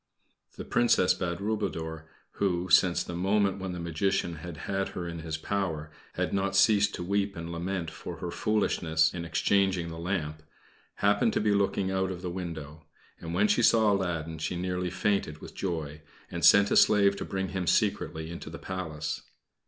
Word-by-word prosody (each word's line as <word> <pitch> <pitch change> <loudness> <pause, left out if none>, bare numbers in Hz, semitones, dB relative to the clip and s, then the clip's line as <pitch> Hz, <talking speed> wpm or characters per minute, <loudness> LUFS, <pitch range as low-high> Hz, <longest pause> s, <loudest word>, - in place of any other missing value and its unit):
The - - -6
Princess 105 -6 +3
Badroulboudour, 85 -4 -3 0.3
who, 90 -2 0
since 90 0 +5
the - - -7
moment 100 +2 +1
when 95 -1 -4
the 90 - -5
Magician 85 +1 -1
had 85 +1 -8
had 95 0 -1
her 85 -1 -3
in 85 -1 -5
his 80 -1 -4
power, 80 -4 -3 0.2
had - - -2
not 95 0 0
ceased 105 +1 +4
to - - -5
weep 100 +2 0
and 85 0 -6
lament 85 0 -3
for - - -8
her 90 - -5
foolishness 80 -7 +1
in 85 -1 -5
exchanging 95 0 +1
the 80 0 -7
lamp, 80 -4 -3 0.5
happened 100 0 +2
to - - +1
be 105 -1 +2
looking 100 -1 +1
out 95 0 0
of 90 -1 -6
the 90 - -3
window; 80 -4 -6 0.4
and 85 +1 -5
when 100 +4 +4
she 120 - +3
saw 110 -2 +5
Aladdin 85 -4 -2
she 80 - -2
nearly 90 0 -2
fainted 95 -4 0
with - - -11
joy, 80 -5 -4 0.3
and 85 - -4
sent 100 0 +7
a - - +3
slave 100 -2 +5
to - - -4
bring 95 0 -3
him 95 -2 -3
secretly 80 0 0
into 85 -2 -7
the 85 - -7
Palace. 80 -5 -4
90 Hz, 180 wpm, -28 LUFS, 80-100 Hz, 0.5 s, sent